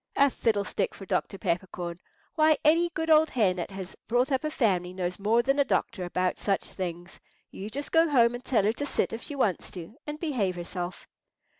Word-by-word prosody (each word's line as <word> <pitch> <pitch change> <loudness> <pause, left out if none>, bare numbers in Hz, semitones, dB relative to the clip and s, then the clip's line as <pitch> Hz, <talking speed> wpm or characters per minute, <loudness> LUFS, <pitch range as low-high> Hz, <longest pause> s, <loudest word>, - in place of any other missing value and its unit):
A 280 -1 +5
fiddlestick 210 -4 0
for 195 - -9
Dr. 195 - -1
Peppercorn! 175 -1 -3 0.3
Why, 310 -1 +4
any 335 +3 +5
good 320 -1 -1
old 310 0 +6
hen 195 -7 +2
that 175 - -3
has 190 -2 -7
brought 245 +4 +2
up 265 +1 +1
a 305 - 0
family 185 - +1
knows 180 0 -3
more 225 +4 +3
than 275 +3 +1
a - - +6
doctor 230 -7 -1
about 180 +1 -1
such 195 -2 0
things. 175 -1 -6 0.3
You 200 +2 -7
just 280 +6 -5
go 325 0 +4
home 240 -4 +4
and 245 +1 -6
tell 230 -6 +2
her 215 +2 +2
to 285 - -4
sit - - 0
if 225 - -4
she 290 - -5
wants 210 -9 0
to, 180 +4 -9
and 300 0 -5
behave 245 - -1
herself." 175 +1 -5
215 Hz, 205 wpm, -28 LUFS, 185-280 Hz, 0.3 s, old